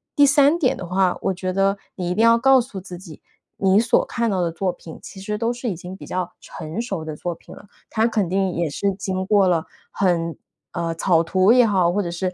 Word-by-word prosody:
第 290 - +6
三 285 +2 +4
点 275 -7 +1
的 185 - -7
话， 185 0 +1
我 195 - 0
觉 185 0 -4
得 195 +1 +1 0.2
你 180 -2 -3
一 180 - -1
定 220 - +2
要 230 0 +6
告 270 +1 +5
诉 230 -5 -8
自 180 -1 -9
己， 170 -5 -12 0.4
你 195 +1 +3
所 235 +1 +3
看 235 -1 -1
到 190 -3 0
的 170 -1 0
作 185 +2 -1
品 165 -2 -12
其 195 - -11
实 210 +2 -3
都 230 +1 0
是 245 0 -4
已 190 - -3
经 180 +2 -9
比 - - -11
较 180 -1 -3
成 160 +4 -7
熟 195 -9 -4
的 155 -1 -5
作 175 +3 -4
品 - - -14
了， - - -14 0.2
它 220 0 +1
肯 210 -6 -1
定 190 0 0
也 170 -2 -1
是 200 +7 -1
经 190 -1 -3
过 200 -1 +3
了 170 -3 +1 0.3
很 170 -3 0 0.4
呃， 165 -1 -2
草 165 0 +2
图 185 +4 +3
也 245 -1 +6
好， 185 -4 +2
或 205 - +1
者 175 - -4
是 180 +2 -3
190 Hz, 265 characters per minute, -22 LUFS, 175-215 Hz, 0.4 s, 第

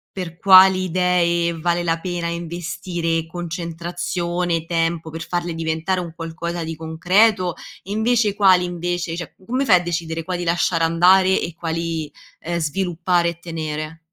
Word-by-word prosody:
per 175 -3 -6
quali 190 0 +7
idee 170 -2 +1
vale 175 +1 0
la 165 -1 0
pena 175 -1 -3
investire 170 0 -3
concentrazione, 170 0 -3
tempo, 165 -1 -1
per 160 +1 -7
farle 175 -1 -2
diventare 165 +3 -1
un 170 -2 -6
qualcosa 170 +1 -5
di 160 0 -5
concreto? 180 +4 +2 0.3
E 195 - -9
invece 220 -1 +2
quali, 190 -3 +5
invece 175 -1 -3
cioè, 170 - -7
come 255 +5 -1
fai 200 - +6
a - - -9
decidere 165 -1 -3
quali 180 0 -3
lasciare 170 -1 +1
andare 185 +3 +4
e 175 - -4
quali, 165 -1 -3 0.3
ehm, 170 +1 -3
sviluppare 175 +2 0
e 170 -1 -4
tenere? 160 -1 -5
170 Hz, 145 wpm, -21 LUFS, 165-180 Hz, 0.3 s, quali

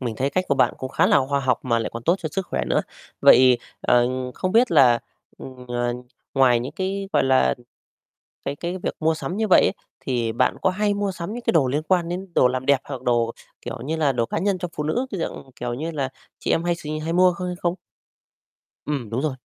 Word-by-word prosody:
mình 120 -4 -4
thấy 135 +4 0
cách 185 +4 0
của 140 - +3
bạn - - +2
cũng 130 - -4
khá - - +3
là - - +5
khoa 140 -1 +1
học 130 -3 +1
mà 115 -2 +1
lại 115 - -3
còn 115 - -6
tốt 170 +8 +3
cho 160 -3 -4
sức 190 0 -2
khỏe - - -2
nữa. - - +2 0.4
Vậy, 125 -1 +7 0.2
ờ, 120 0 +3 0.3
không 185 - -2
biết 235 +2 +4
là, 130 -7 +6 0.4
ừm, 125 -1 -10
ờ, 120 0 -1 0.4
ngoài 125 -3 +4
những 130 +4 -5
cái, 195 +3 -3
gọi - - +3
là, 130 - +3 0.9
cái 140 - -2
cái 175 +5 -4
việc 180 - -4
mua 160 +1 +2
sắm 175 +4 -5
như 220 - 0
vậy 185 - +6
ấy, - - +3 0.3
thì 120 -3 -1
bạn 115 - +1
có 190 - +3
hay 205 +2 0
mua 200 -1 -1
sắm 180 +2 -6
những 240 - -5
cái - - +2
đồ 150 -6 +3
liên 145 +4 -1
quan 175 0 +1
đến 185 +2 -4
đồ 125 - +5
làm 130 +1 -3
đẹp 140 -2 +3
hoặc 135 -3 -7
đồ, 120 -2 +1 0.3
kiểu - - -6
như 160 +3 -1
là, 150 -3 +2
đồ 120 -3 0
cá - - -3
nhân 195 +1 0
cho 180 0 -4
phụ 150 - -2
nữ, 235 - 0
cái 195 - -4
dạng, 135 -4 -5
kiểu 120 0 -3
như 155 +6 -4
là, 140 -4 -2 0.3
chị - - -1
em 165 - +1
hay 175 0 +1
s 160 -3 -10 0.2
hay 165 +1 -2
mua 180 +1 +5
hay 180 -1 -3
không? 175 0 0 1.1
Ừm, 140 -7 -3
đúng 120 +3 -1
rồi. 155 -4 -1
150 Hz, 245 wpm, -23 LUFS, 125-180 Hz, 1.1 s, Vậy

